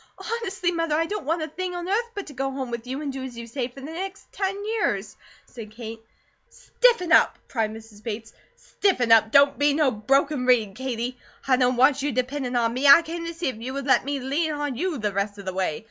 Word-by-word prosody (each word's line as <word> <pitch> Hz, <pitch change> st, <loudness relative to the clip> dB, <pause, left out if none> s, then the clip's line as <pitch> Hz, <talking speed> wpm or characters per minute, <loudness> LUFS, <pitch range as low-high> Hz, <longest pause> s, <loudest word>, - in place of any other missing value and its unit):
"Honestly, 385 Hz, -6 st, -2 dB
Mother, 330 Hz, -3 st, 0 dB
I 325 Hz, +1 st, +2 dB
don't 405 Hz, -5 st, -5 dB
want 325 Hz, +1 st, 0 dB
a -, -, -3 dB
thing 360 Hz, +3 st, -5 dB
on 350 Hz, 0 st, -5 dB
earth 455 Hz, +5 st, 0 dB
but 405 Hz, -, -4 dB
to 290 Hz, -, -11 dB
go 270 Hz, +1 st, -2 dB
home 265 Hz, -2 st, -5 dB
with 235 Hz, 0 st, -5 dB
you 265 Hz, +4 st, -4 dB
and 280 Hz, -2 st, -3 dB
do 265 Hz, -1 st, -5 dB
as 250 Hz, -2 st, -7 dB
you 235 Hz, -, -6 dB
say 240 Hz, +1 st, -3 dB
for 260 Hz, +2 st, -13 dB
the -, -, -8 dB
next 380 Hz, +4 st, -7 dB
ten 390 Hz, -1 st, -2 dB
years," 440 Hz, 0 st, -1 dB, 0.3 s
said 225 Hz, -4 st, -10 dB
Kate. 225 Hz, -1 st, -7 dB, 0.5 s
"Stiffen 465 Hz, -9 st, +1 dB
up!" -, -, +5 dB
cried 225 Hz, -4 st, -1 dB
Mrs. 220 Hz, -1 st, -12 dB
Bates. 225 Hz, 0 st, -6 dB, 0.2 s
"Stiffen 255 Hz, -, 0 dB
up!" 220 Hz, -1 st, +6 dB
"Don't 280 Hz, +4 st, +5 dB
be 290 Hz, 0 st, +3 dB
no 300 Hz, -4 st, +3 dB
broken 270 Hz, +4 st, +1 dB
reed, 225 Hz, -6 st, +3 dB
Katie! 250 Hz, 0 st, -4 dB, 0.3 s
I 260 Hz, -, +5 dB
don't 250 Hz, 0 st, +2 dB
want 270 Hz, +2 st, +4 dB
you 290 Hz, +1 st, 0 dB
dependin' 255 Hz, +1 st, -2 dB
on 230 Hz, -1 st, +1 dB
ME; 265 Hz, +4 st, +1 dB
I 280 Hz, +5 st, +9 dB
came 335 Hz, +1 st, -5 dB
to 335 Hz, -, -4 dB
see 335 Hz, -3 st, -1 dB
if 255 Hz, -, -6 dB
you 245 Hz, +4 st, -6 dB
would 275 Hz, -1 st, -4 dB
let 260 Hz, -3 st, +4 dB
ME 280 Hz, +1 st, -2 dB
lean 295 Hz, +5 st, -1 dB
on 290 Hz, -3 st, -3 dB
YOU 340 Hz, +4 st, -2 dB
the 210 Hz, -3 st, -2 dB
rest 200 Hz, +1 st, -2 dB
of 200 Hz, -, -10 dB
the 185 Hz, -, -3 dB
way. 185 Hz, -5 st, -1 dB
270 Hz, 240 wpm, -25 LUFS, 235-330 Hz, 0.5 s, I